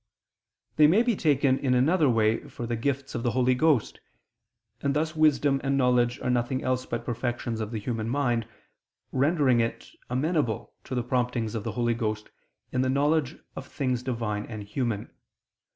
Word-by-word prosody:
They 150 -1 +7
may 200 +9 +4
be 240 -2 +1
taken 140 -5 +2
in 130 -2 +1
another 150 +4 +3
way 110 -1 +1
for 120 - -6
the 120 0 -2
gifts 140 +3 -2
of - - -3
the 120 - +1
Holy 130 0 +4
Ghost: 140 -3 +2 0.8
and 140 0 0
thus 155 +1 -1
wisdom 145 -3 +3
and 135 0 +1
knowledge 125 -2 +2
are - - -1
nothing 125 +2 0
else 130 0 -1
but 120 0 -4
perfections 120 -1 -3
of 110 - -3
the 115 - -4
human 110 +1 -3
mind, 120 -4 0 0.6
rendering 140 -3 +3
it 115 0 -2 0.2
amenable 130 - -1
to 130 - -4
the 125 - 0
promptings 125 -3 -1
of 110 -3 -3
the - - -4
Holy 120 -1 +1
Ghost 110 -2 -3 0.4
in 125 - 0
the 130 - +1
knowledge 145 +2 +1 0.2
of - - -7
things 130 -4 -2
Divine 115 -5 -3
and 110 -3 -6
human. 105 0 -3
125 Hz, 175 wpm, -27 LUFS, 115-140 Hz, 0.8 s, They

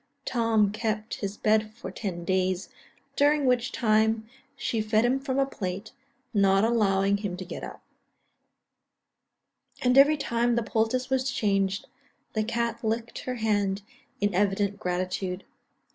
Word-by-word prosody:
Tom 225 -4 +2
kept 215 0 -2
his 200 0 -3
bed 215 0 +2
for 210 -5 -7
ten 180 -4 -5
days, 185 0 0 0.5
during 290 0 +3
which 250 -1 +2
time, 220 -1 +2 0.3
she 230 -4 -1
fed 215 +1 +2
him 255 +3 +2
from 270 -1 -2
a 275 - +3
plate, 200 -5 -5 0.4
not 195 -1 +4
allowing 200 -3 +2
him 200 -3 -4
to 185 - -6
get - - -7
up; - - -8 2.0
and 250 +1 +5
every 300 +2 +6
time 240 -3 +1
the 235 - +1
poultice 230 +4 0
was 260 0 +1
changed, 195 -4 0 0.5
the 215 - +1
cat 235 +1 -2
licked 225 +1 -2
her 255 - -2
hand 205 -3 0 0.4
in 205 -1 +1
evident 200 +1 +1
gratitude. 180 +1 -2
215 Hz, 140 wpm, -27 LUFS, 195-235 Hz, 2.0 s, every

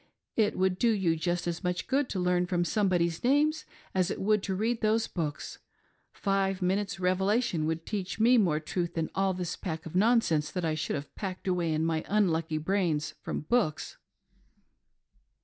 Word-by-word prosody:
It 215 -2 +2
would 185 -1 +1
do 235 - +3
you 190 -7 +2
just 175 +2 -1
as 175 +2 -3
much 180 0 -1
good 275 0 0
to 190 - -2
learn 180 0 +2
those 175 -1 0
somebodies' 175 -5 +1
names 300 +4 +2 0.3
as 185 -2 +1
it - - -3
would 210 +1 +2
to 190 -1 -2
read 225 +4 -1
those 220 +1 +2
books. 155 -5 -4 0.5
Five 195 -1 0
minutes 190 0 -1
revelation 185 -1 +1
would 160 0 -2
teach 195 -1 -4
me 240 +2 +5
more 165 -7 +2
truth 170 +2 -3
than 165 -1 -2
all 195 -1 +1
this 180 -2 -3
pack 160 -3 -5
of 165 - -8
non 230 +5 +5
sense 155 -6 0
that 180 -2 -2
I 160 - +1
should 155 -1 -2
have 140 0 -6
packed 190 -1 -6
away 175 -3 +1
in 155 +1 0
my 160 -1 0
unlucky 165 -6 +1
brains 160 -2 0
from - - -3
books." 155 -1 0
185 Hz, 185 wpm, -29 LUFS, 165-205 Hz, 0.5 s, me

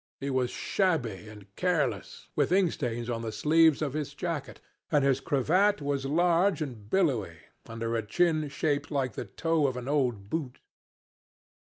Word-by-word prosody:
He 140 0 -3
was 130 -2 +1
shabby 125 - -1
and 105 -2 -14
careless, 180 -5 -1
with - - +1
ink 185 -2 +4
stains 120 -3 -3
on 115 -2 -2
the 115 -1 -4
sleeves 155 +6 +4
of 140 -3 -2
his 145 -1 -4
jacket, 165 -3 -4 0.3
and 145 -3 +3
his 135 -1 +3
cravat 180 +10 +2
was 140 -2 -2
large 175 +5 +3
and 120 -9 -6
billowy, 120 - +1 0.3
under 115 0 -3
a 115 - +1
chin 155 +6 +1
shaped 145 +1 -1
like 135 -5 -1
the - - -5
toe 165 -3 0
of 130 -2 -3
an 125 0 -6
old 125 -9 0
boot. 135 0 -3
140 Hz, 165 wpm, -29 LUFS, 120-165 Hz, 0.3 s, ink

